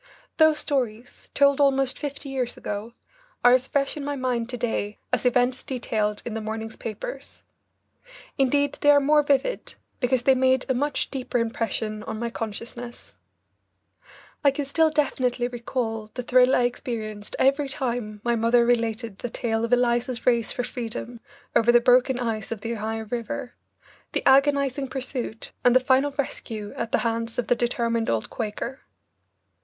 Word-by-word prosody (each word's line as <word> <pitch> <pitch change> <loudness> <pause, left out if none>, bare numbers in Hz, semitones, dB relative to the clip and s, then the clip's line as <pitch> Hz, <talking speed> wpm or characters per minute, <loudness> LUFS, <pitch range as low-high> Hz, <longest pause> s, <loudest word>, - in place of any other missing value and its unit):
Those 315 -1 +5
stories, 245 -5 -3
told 280 0 +4
almost 270 -2 +2
fifty 285 -1 -5
years 255 -3 -2
ago, 210 +3 -5 0.5
are 245 - +9
as 255 0 +3
fresh 275 -1 0
in 295 - -5
my 285 0 -2
mind 250 -3 -1
to 250 - -4
day 225 -3 -2 0.2
as - - +2
events 250 +1 +2
detailed 215 -5 -2
in 235 - -4
the 225 - -3
morning's 220 +1 -5
papers. - - -7 0.9
Indeed 285 +2 +1
they 290 - +4
are 290 0 +8
more 295 +2 +4
vivid, 285 - 0 0.2
because 250 -1 +1
they 265 - +6
made 260 0 +2
a 260 - +2
much 290 +4 -1
deeper 260 -2 -2
impression 225 -2 -2
on 220 +1 -5
my 235 +1 -3
consciousness. 230 +2 -7 1.3
I 285 - +7
can 275 +1 -2
still 315 +3 +3
definitely 255 -5 0
recall 230 -3 -3
the 250 - -3
thrill 255 +1 +5
I 250 - +3
experienced 220 -4 -3
every 275 +1 +2
time 240 -6 -3
my 240 0 +1
mother 235 +1 +3
related 230 -3 0
the 245 - -4
tale 225 -1 -1
of 230 - -2
Eliza's 245 0 +1
race 235 -2 +3
for 245 - -2
freedom 240 0 -5 0.4
over 230 +1 +5
the 240 - +6
broken 250 +1 +4
ice 225 -4 -3
of 225 -3 -4
the 230 +2 -3
Ohio 220 0 -3
River, 240 +2 -4 0.6
the - - -1
agonizing 275 0 +3
pursuit, 255 -4 -5
and 245 0 +5
the - - +8
final 260 +2 +3
rescue 220 -6 -4
at 230 - -4
the - - +3
hands 230 0 -2
of 245 - 0
the 245 - +2
determined 235 -1 0
old 110 -1 -1
Quaker. 230 +4 -4
245 Hz, 165 wpm, -25 LUFS, 230-270 Hz, 1.3 s, are